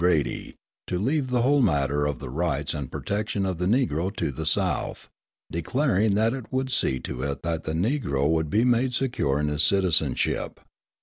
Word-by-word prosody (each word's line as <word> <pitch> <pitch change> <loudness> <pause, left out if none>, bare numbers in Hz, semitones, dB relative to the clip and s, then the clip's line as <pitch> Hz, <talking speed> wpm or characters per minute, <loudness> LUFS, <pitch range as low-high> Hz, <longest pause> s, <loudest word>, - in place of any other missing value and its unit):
Grady, 85 -5 +1 0.3
to 90 - -1
leave 135 - 0
the 125 -2 +2
whole 140 +2 +4
matter 75 - +2
of 70 -3 -2
the - - -7
rights 80 +1 -1
and 70 -4 -5
protection 100 -1 -2
of 95 -3 -2
the 90 - 0
Negro 95 - +1
to - - -1
the 65 - -4
South, - - -1 0.4
declaring 105 - +1
that 110 +3 +2
it 130 -5 -7
would 130 0 -1
see 65 - 0
to 65 - -5
it 70 0 -3
that 80 -1 -2
the 80 - -2
Negro 85 - 0
would 80 -1 +1
be 110 +6 +3
made 125 +1 +2
secure 120 - 0
in 75 - 0
his 75 +1 +1
citizenship. 85 -8 +1
90 Hz, 185 wpm, -26 LUFS, 75-120 Hz, 0.4 s, whole